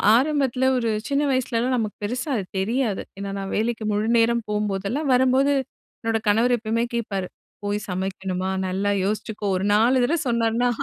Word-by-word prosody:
ஆரம்பத்தில 265 Hz, -1 st, +2 dB
ஒரு 230 Hz, -2 st, 0 dB, 0.2 s
சின்ன 280 Hz, 0 st, +1 dB
வயசுலலாம் 255 Hz, -1 st, 0 dB
நமக்கு 215 Hz, -3 st, -3 dB
பெருசா 250 Hz, +7 st, -2 dB
அது 200 Hz, -, -2 dB, 0.2 s
தெரியாது. 225 Hz, +1 st, 0 dB, 0.2 s
ஏன்னா, 200 Hz, 0 st, -4 dB
நான் 195 Hz, 0 st, -5 dB
வேலைக்கு 225 Hz, +1 st, -1 dB
முழுநேரம் 230 Hz, +2 st, +2 dB
போபோதெல்லாம், 210 Hz, +7 st, -1 dB
வரம்போது, 260 Hz, +2 st, +4 dB, 0.5 s
என்னோட 225 Hz, -1 st, 0 dB
கணவர் 230 Hz, +4 st, +4 dB
எப்பவுமே 230 Hz, +1 st, -1 dB
கேட்பாரு, 200 Hz, -5 st, -2 dB, 0.4 s
"போய் 205 Hz, 0 st, -1 dB
சமைக்கணுமா, 190 Hz, 0 st, -2 dB, 0.2 s
நல்லா 195 Hz, +2 st, 0 dB
யோசிச்சுக்கோ!" 210 Hz, +1 st, -2 dB
ஒரு 190 Hz, -, -2 dB
4 245 Hz, +4 st, +4 dB
தடவ 315 Hz, +8 st, +2 dB
சொன்னார்னா, 235 Hz, +1 st, +2 dB
225 Hz, 145 wpm, -23 LUFS, 205-250 Hz, 0.5 s, வரம்போது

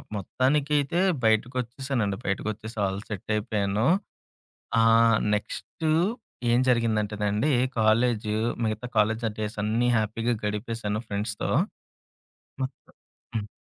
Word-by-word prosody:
మొత్తానికి 135 Hz, +8 st, 0 dB
అయితే 145 Hz, +4 st, 0 dB, 0.2 s
బయటకొచ్చేసానండి. 120 Hz, -1 st, 0 dB
బయటకొచ్చేసి 110 Hz, +3 st, -3 dB
all 95 Hz, 0 st, -2 dB
set 105 Hz, -2 st, -7 dB
అయిపోయాను. 105 Hz, +1 st, 0 dB, 0.9 s
ఆహ్, 115 Hz, 0 st, +5 dB, 0.2 s
నెక్స్టు 155 Hz, +9 st, -3 dB, 0.6 s
ఏం 120 Hz, -, +4 dB
జరిగిందంటేనండి, 105 Hz, 0 st, +1 dB, 0.3 s
కాలేజు 110 Hz, -1 st, +2 dB, 0.3 s
మిగతా 110 Hz, +2 st, -2 dB
కాలేజ్ 110 Hz, +2 st, +2 dB
డేస్ 105 Hz, 0 st, -3 dB
అన్నీ 115 Hz, +3 st, +1 dB
హ్యాపీగా 115 Hz, +2 st, 0 dB
గడిపేసాను 105 Hz, 0 st, -2 dB
ఫ్రెండ్స్‌తో. 105 Hz, +1 st, -2 dB, 1.1 s
మొత్తం. 130 Hz, 0 st, -3 dB, 0.6 s
హ్మ్. 105 Hz, -1 st, -4 dB
110 Hz, 95 wpm, -26 LUFS, 105-120 Hz, 1.1 s, ఆహ్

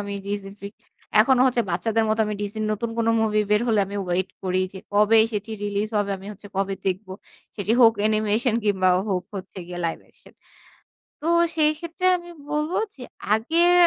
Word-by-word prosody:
আমি 205 Hz, 0 st, -5 dB
Disney 200 Hz, -1 st, -4 dB
freak. 200 Hz, +1 st, -8 dB, 0.5 s
এখনো 255 Hz, +2 st, +4 dB
হচ্ছে 250 Hz, -2 st, +2 dB
বাচ্চাদের 225 Hz, +6 st, +1 dB
মতো 220 Hz, +1 st, +1 dB, 0.2 s
Disney 205 Hz, +2 st, -4 dB
র -, -, -1 dB
নতুন 230 Hz, +2 st, -3 dB
কোন 230 Hz, -, +1 dB
মুভি 215 Hz, -1 st, +2 dB
বের 210 Hz, 0 st, +4 dB
হলে 220 Hz, -3 st, +3 dB
আমি 200 Hz, +1 st, -6 dB
ওয়েট 180 Hz, +2 st, 0 dB
করি 185 Hz, -1 st, 0 dB
যে, 190 Hz, -, -8 dB
কবে 210 Hz, +2 st, +5 dB
সেটি 210 Hz, +1 st, -4 dB
রিলিজ 205 Hz, +1 st, -1 dB
হবে, 205 Hz, -1 st, -1 dB
আমি 190 Hz, -, -12 dB
হচ্ছে 205 Hz, 0 st, -13 dB
কবে 195 Hz, 0 st, 0 dB
দেখব? 190 Hz, +1 st, -2 dB, 0.5 s
সেটি 210 Hz, +1 st, 0 dB
হোক 230 Hz, -1 st, +8 dB
অ্যানিমেশন 215 Hz, +2 st, +1 dB
কিংবা 190 Hz, -3 st, +2 dB, 0.2 s
হোক 180 Hz, -2 st, 0 dB
হচ্ছে 190 Hz, 0 st, -8 dB
গিয়ে 175 Hz, 0 st, -7 dB
লাইভ 165 Hz, -, -1 dB
অ্যাকশন। -, -, -22 dB, 0.9 s
তো 310 Hz, -, -3 dB, 0.3 s
সেইক্ষেত্রে 320 Hz, +3 st, 0 dB
আমি 345 Hz, 0 st, -11 dB, 0.2 s
বলবো 300 Hz, +3 st, -1 dB, 0.2 s
যে 265 Hz, -, -14 dB, 0.3 s
আগের 330 Hz, +11 st, +3 dB
210 Hz, 175 wpm, -24 LUFS, 195-230 Hz, 0.9 s, হোক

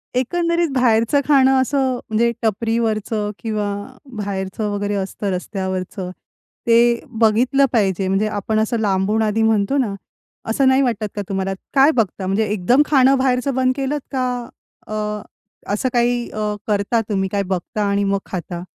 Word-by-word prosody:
एकंदरीत 335 Hz, +6 st, +1 dB
बाहेरचं 245 Hz, +2 st, +3 dB
खाणं 265 Hz, -2 st, +5 dB
असं 265 Hz, -1 st, +1 dB, 0.2 s
म्हणजे 235 Hz, +2 st, +2 dB
टपरीवरचं 220 Hz, -1 st, -1 dB
किंवा 215 Hz, -2 st, -2 dB, 0.5 s
बाहेरचं 200 Hz, +1 st, -3 dB
वगैरे 205 Hz, 0 st, -2 dB
असतं 195 Hz, +1 st, -3 dB
रस्त्यावरचं. 185 Hz, 0 st, -4 dB, 0.6 s
ते 235 Hz, 0 st, +4 dB, 0.2 s
बघितलं 245 Hz, +5 st, +4 dB
पाहिजे 195 Hz, -4 st, +1 dB
म्हणजे 195 Hz, +3 st, +1 dB
आपण 215 Hz, +1 st, -1 dB
असं 225 Hz, +2 st, 0 dB
लांबून 205 Hz, +1 st, +1 dB
आधी 215 Hz, +1 st, +1 dB
म्हणतो 220 Hz, +4 st, +2 dB
ना, 240 Hz, -7 st, 0 dB, 0.6 s
असं 265 Hz, +4 st, +2 dB
नाही 265 Hz, +1 st, +4 dB
वाटत 230 Hz, -5 st, 0 dB
का 205 Hz, -, -2 dB
तुम्हाला 195 Hz, 0 st, -1 dB, 0.2 s
काय 275 Hz, +2 st, +6 dB
बघता? 210 Hz, -, -1 dB
म्हणजे 200 Hz, +3 st, +1 dB
एकदम 210 Hz, +7 st, +3 dB
खाणं 270 Hz, -2 st, +4 dB
बाहेरचं 260 Hz, +1 st, +1 dB
बंद 255 Hz, 0 st, +2 dB
केलंत? 280 Hz, +2 st, -2 dB
का 250 Hz, -2 st, -2 dB, 0.4 s
अ, -, -, -6 dB, 0.8 s
असं 255 Hz, +5 st, 0 dB
काही 240 Hz, 0 st, +1 dB
अ, 210 Hz, -1 st, -2 dB
करता 210 Hz, +2 st, +1 dB
तुम्ही, 195 Hz, -2 st, 0 dB
काय 200 Hz, -1 st, 0 dB
बघता 190 Hz, +3 st, -2 dB
आणि 200 Hz, 0 st, +1 dB
मग 200 Hz, 0 st, +1 dB
खाता? 175 Hz, -1 st, -5 dB
220 Hz, 145 wpm, -20 LUFS, 200-255 Hz, 0.8 s, काय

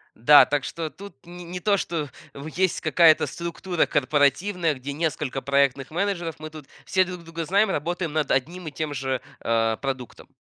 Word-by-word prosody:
Да, 145 Hz, +6 st, +8 dB
так 140 Hz, -1 st, -1 dB
что 160 Hz, +3 st, -4 dB
тут 200 Hz, -2 st, -12 dB
не 175 Hz, 0 st, -10 dB
не 180 Hz, +1 st, -6 dB
то, 205 Hz, +1 st, +2 dB
что 165 Hz, -5 st, -3 dB, 0.3 s
в 140 Hz, +2 st, -8 dB
есть 180 Hz, +3 st, 0 dB
какая-то 160 Hz, 0 st, +5 dB
структура 170 Hz, +1 st, -2 dB
корпоративная, 155 Hz, +5 st, +1 dB
где 135 Hz, +2 st, -6 dB
несколько 150 Hz, -3 st, -2 dB
проектных 140 Hz, 0 st, +1 dB
менеджеров, 175 Hz, -2 st, -2 dB
мы 155 Hz, 0 st, -8 dB
тут 155 Hz, -2 st, -11 dB, 0.2 s
все 185 Hz, 0 st, +2 dB
друг 180 Hz, -1 st, -8 dB
друга 165 Hz, 0 st, -5 dB
знаем, 200 Hz, +5 st, +2 dB
работаем 170 Hz, +1 st, -2 dB
над 155 Hz, -1 st, -1 dB
одним 170 Hz, +7 st, -1 dB
и -, -, -9 dB
тем 150 Hz, +1 st, -4 dB
же, 135 Hz, -2 st, -2 dB, 0.2 s
а, 115 Hz, -1 st, +1 dB
продуктом. 130 Hz, -3 st, -6 dB
155 Hz, 180 wpm, -24 LUFS, 140-175 Hz, 0.3 s, Да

